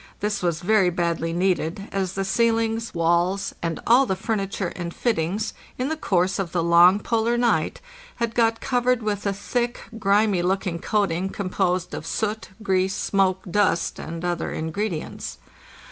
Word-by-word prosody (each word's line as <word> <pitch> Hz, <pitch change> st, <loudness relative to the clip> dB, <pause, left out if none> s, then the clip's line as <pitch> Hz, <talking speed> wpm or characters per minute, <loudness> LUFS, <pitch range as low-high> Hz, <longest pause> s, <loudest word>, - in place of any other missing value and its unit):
This 210 Hz, 0 st, -1 dB
was 170 Hz, -2 st, 0 dB
very 195 Hz, -1 st, +4 dB
badly 170 Hz, -1 st, -1 dB
needed, 180 Hz, +1 st, 0 dB
as 190 Hz, -2 st, -1 dB
the 195 Hz, 0 st, -2 dB
ceilings, 225 Hz, +1 st, +1 dB
walls, 175 Hz, +4 st, +1 dB
and 165 Hz, -1 st, -2 dB
all 250 Hz, +3 st, +5 dB
the 190 Hz, -, 0 dB
furniture 195 Hz, -2 st, -2 dB
and 170 Hz, -1 st, -4 dB
fittings, 210 Hz, 0 st, -1 dB, 0.2 s
in 255 Hz, +3 st, -1 dB
the 320 Hz, -, -1 dB
course 185 Hz, -, +1 dB
of 185 Hz, -4 st, -3 dB
the 170 Hz, -2 st, +1 dB
long 175 Hz, +3 st, +6 dB
polar 230 Hz, +2 st, +1 dB
night, 240 Hz, -, +1 dB, 0.3 s
had 235 Hz, -1 st, -2 dB
got 230 Hz, -1 st, +2 dB
covered 250 Hz, -1 st, +1 dB
with 205 Hz, -1 st, -1 dB
a 200 Hz, -, +1 dB
thick, 240 Hz, +5 st, -2 dB, 0.2 s
grimy 200 Hz, -2 st, +3 dB
looking 180 Hz, -1 st, -1 dB
coating 190 Hz, -2 st, 0 dB
composed 185 Hz, -2 st, -1 dB
of -, -, -5 dB
soot, 220 Hz, 0 st, -2 dB
grease, 190 Hz, 0 st, +1 dB
smoke, 190 Hz, -1 st, +1 dB
dust, 205 Hz, -4 st, +1 dB
and 165 Hz, +1 st, -6 dB
other 175 Hz, -1 st, -1 dB
ingredients. 160 Hz, -, -4 dB
195 Hz, 155 wpm, -24 LUFS, 175-220 Hz, 0.3 s, long